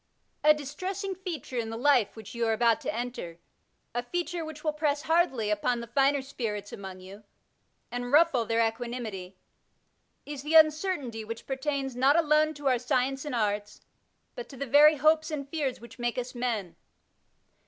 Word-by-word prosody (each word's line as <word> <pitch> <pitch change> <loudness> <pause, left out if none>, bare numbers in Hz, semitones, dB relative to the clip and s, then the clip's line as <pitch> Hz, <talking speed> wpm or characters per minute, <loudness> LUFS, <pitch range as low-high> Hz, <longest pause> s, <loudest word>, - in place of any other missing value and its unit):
A 305 - +8
distressing 365 +7 -3
feature 340 - -5
in 225 -1 -3
the 225 - -5
life 250 -4 +3
which 220 -3 -10
you 235 -1 -1
are 225 - +2
about 230 0 +2
to - - -2
enter, 235 -8 -5 0.6
a 240 - -1
feature 345 +5 -3
which 315 -1 -8
will 305 -2 0
press 300 -1 0
hardly 315 -10 +1
upon 235 +4 0
the 235 - -6
finer 275 +3 +2
spirits 210 -6 -5
among 190 -2 -8
you 195 +3 -12 0.7
and 245 0 -4
ruffle 295 -5 +5
their 230 0 +2
equanimity, 225 -5 -6 0.9
is 290 -2 -6
the 300 +3 -1
un 310 -1 +8
certainty 295 - -4
which 230 +1 -7
pertains 270 -1 -2
not 265 +3 +4
alone 310 -1 +3
to 290 0 -4
our 255 -2 +3
science 265 +2 0
and 290 - -3
art, 210 -2 -1 0.5
but - - -8
to 275 - -11
the 280 - -3
very 295 +4 +7
hopes 310 +2 +3
and 290 -3 -4
fears 285 -5 -2
which 235 +1 -13
make 240 0 -1
us 250 0 -4
men. 230 -8 -3
260 Hz, 175 wpm, -28 LUFS, 230-300 Hz, 0.9 s, A